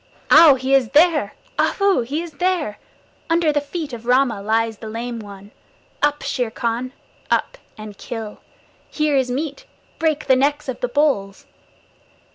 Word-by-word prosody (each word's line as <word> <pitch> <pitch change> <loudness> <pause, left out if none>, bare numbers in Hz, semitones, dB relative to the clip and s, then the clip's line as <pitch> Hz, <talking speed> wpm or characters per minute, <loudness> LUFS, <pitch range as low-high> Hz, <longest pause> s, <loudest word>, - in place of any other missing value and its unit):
Ow! 315 -2 +9
He 260 +1 -2
is 265 -4 +3
there. 310 - +3 0.2
Ahoo! 395 -8 +2
He 285 +8 -3
is 340 - -9
there. 325 - -1 0.5
Under 330 -2 +2
the 290 - +1
feet 290 -1 -6
of 235 0 -8
Rama 250 -4 +2
lies 225 +1 0
the 220 - -7
Lame 235 +1 -5
One! 200 -1 -11 0.5
Up, 290 0 +1
Shere 250 -4 -1
Khan! 235 +3 -3 0.4
Up - - 0 0.2
and 215 -1 -9
kill! 220 -3 -7 0.5
Here 305 -2 0
is 260 -2 +1
meat; 290 - -4 0.3
break 315 -2 0
the 265 - +4
necks 285 +3 0
of 260 - -4
the 245 - -1
bulls! 245 -8 0
265 Hz, 155 wpm, -20 LUFS, 225-300 Hz, 0.5 s, Ow